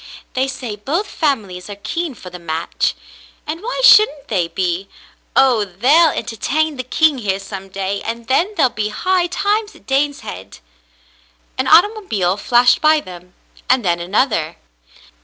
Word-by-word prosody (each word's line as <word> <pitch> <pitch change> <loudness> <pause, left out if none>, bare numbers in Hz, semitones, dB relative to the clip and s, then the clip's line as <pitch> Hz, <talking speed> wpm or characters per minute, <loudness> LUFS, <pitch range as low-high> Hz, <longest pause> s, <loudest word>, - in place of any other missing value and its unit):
They 260 +1 0
say 250 -5 -5
both 300 - -2
families 210 - -2
are 205 - -6
keen 320 +8 -4
for 185 -4 -11
the 180 - -9
match 165 -1 -2 0.3
— - - -26
and 320 +3 -5
why - - -3
shouldn't 305 - +5
they 180 -6 0
be? 180 +2 -2 0.5
Oh, 250 -5 +4
they'll 255 - +3
entertain 290 +6 -2
the 255 - -3
king 290 +2 +2
here 195 -4 -1
some 195 -1 -8
day, 195 +1 -3
and 230 +1 -5
then 345 - +1
there'll 265 -6 +3
be 210 0 -2
high 365 - 0
times 415 +4 -1
at - - -19
Daneshead 270 - -3 0.5
!" - - -35
An 260 - 0
automobile 325 - +3
flashed 245 +3 +3
by 310 0 +4
them, 180 -6 -12 0.3
and 250 -3 +3
then 175 -1 +1
another. 180 - 0
240 Hz, 160 wpm, -18 LUFS, 190-310 Hz, 0.5 s, shouldn't